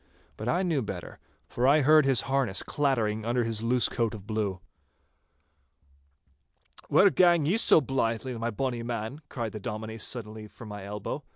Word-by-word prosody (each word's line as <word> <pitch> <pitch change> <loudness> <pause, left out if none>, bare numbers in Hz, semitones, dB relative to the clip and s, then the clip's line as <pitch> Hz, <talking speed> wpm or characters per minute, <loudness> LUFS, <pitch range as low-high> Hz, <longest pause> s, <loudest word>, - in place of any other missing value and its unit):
But 110 +3 -4
I 180 +6 +1
knew 165 -7 0
better, 110 - -7 0.3
for 125 +2 0
I 150 +3 +5
heard 155 +1 +5
his 135 -4 +4
harness 130 -8 0
clattering 115 -7 0
under 120 +2 0
his 115 -1 -2
loose 120 +1 +2
coat 115 -3 -1
of 100 -3 -11
blue. 105 -3 -2 2.3
'Where 200 0 +5
gang 175 -4 +4
ye 170 +7 +2
so 225 - +5
blythe, 115 -4 -1
my 120 -2 -3
bonny 120 +1 -3
man?' 115 +4 -5
cried 115 -4 -4
the 110 - -7
Dominie 110 0 -6
suddenly 110 -1 -5
from 110 +1 -12
my 105 -1 -7
elbow. 105 0 -5
115 Hz, 165 wpm, -28 LUFS, 110-135 Hz, 2.3 s, I